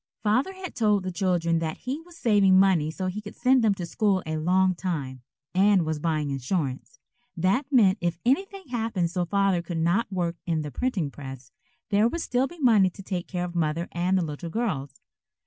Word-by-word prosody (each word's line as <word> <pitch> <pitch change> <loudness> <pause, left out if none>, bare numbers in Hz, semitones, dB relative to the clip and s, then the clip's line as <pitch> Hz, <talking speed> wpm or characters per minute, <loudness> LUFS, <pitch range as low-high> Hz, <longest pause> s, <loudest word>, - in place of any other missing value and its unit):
Father 250 - +1
had 375 -2 -8
told 210 -4 +2
the 185 - -3
children 175 -3 +1
that 160 -1 -3
he 270 +5 -4
was 340 0 -16
saving 200 - +4
money 185 -6 +3
so 185 +4 -4
he 185 +3 -3
could 210 -1 -10
send 255 -1 +3
them 210 -3 +3
to 180 - -5
school 195 +1 +1
a 155 0 -3
long 185 +4 +2
time, 150 -8 -4 0.3
and 190 -1 +4
was 155 -1 -2
buying 155 -2 -1
insurance. 135 0 -3 0.4
That 200 - +1
meant 210 -6 +4
if 175 -1 -1
anything 380 - 0
happened 220 -8 -1
so 180 -1 -1
Father 195 -1 +1
could 170 0 -5
not 175 +7 +1
work 175 -2 -2
in 160 -2 0
the 150 - -6
printing 180 - -1
press, 135 -3 -10 0.4
there 205 +2 +4
would 335 +8 -3
still 250 -1 0
be 345 - -13
money 225 - +4
to 195 +2 -12
take 185 -2 -4
care 180 -1 -3
of 175 - -7
Mother 165 0 -1
and 180 +2 +1
the 180 - +1
little 155 +2 -6
girls. 155 - -3
185 Hz, 200 wpm, -26 LUFS, 165-215 Hz, 0.4 s, saving